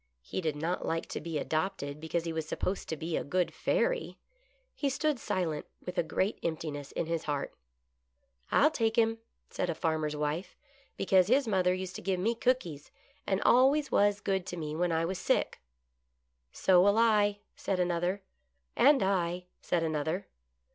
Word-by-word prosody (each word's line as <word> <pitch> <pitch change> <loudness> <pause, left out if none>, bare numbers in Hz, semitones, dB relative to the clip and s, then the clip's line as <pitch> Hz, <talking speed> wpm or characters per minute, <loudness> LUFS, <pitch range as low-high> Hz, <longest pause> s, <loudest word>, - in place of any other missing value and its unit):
He 185 - -4
did 155 -4 -1
not 165 +4 -2
like 165 0 -1
to - - -4
be 165 -1 -3
adopted 155 -2 -2
because 160 +1 -2
he 165 -1 -3
was 160 -1 -3
supposed 185 +4 -3
to 160 - -2
be 160 +2 -3
a - - -1
good 180 +4 0
fairy. - - 0 0.6
He 285 - -1
stood 295 0 0
silent 165 -8 -2 0.2
with 180 - -5
a - - +5
great 185 +5 -1
emptiness 155 -3 -4
in - - -1
his 165 0 -2
heart. 145 -2 -2 0.5
" 60 0 -36
I'll 300 +2 +5
take 225 -6 0
him," 225 -1 +2 0.3
said 180 - -2
a 170 - -1
farmer's 155 -2 -1
wife, 150 +5 -3 0.2
" 275 0 -33
because 185 -1 +4
his 260 +3 +3
mother 185 -4 +2
used 185 -1 -5
to - - -8
give 185 0 -1
me 220 +6 +1
cookies, 225 - -1 0.4
and 190 0 +1
always 275 +5 +4
was 205 0 +3
good 190 -2 -1
to 175 - -5
me 155 -2 -4
when 175 +1 +1
I 165 0 +1
was 185 +2 -3
sick." - - 0 0.5
" 60 0 -49 0.2
So 180 -2 +4
will 200 +3 +4
I," 210 -3 +3
said 190 -2 -2
another. 175 +2 0 0.3
" 65 0 -48
And 275 -2 +5
I," 180 -2 0 0.2
said 170 -2 0
another. 160 +4 -1
180 Hz, 185 wpm, -30 LUFS, 160-205 Hz, 0.6 s, a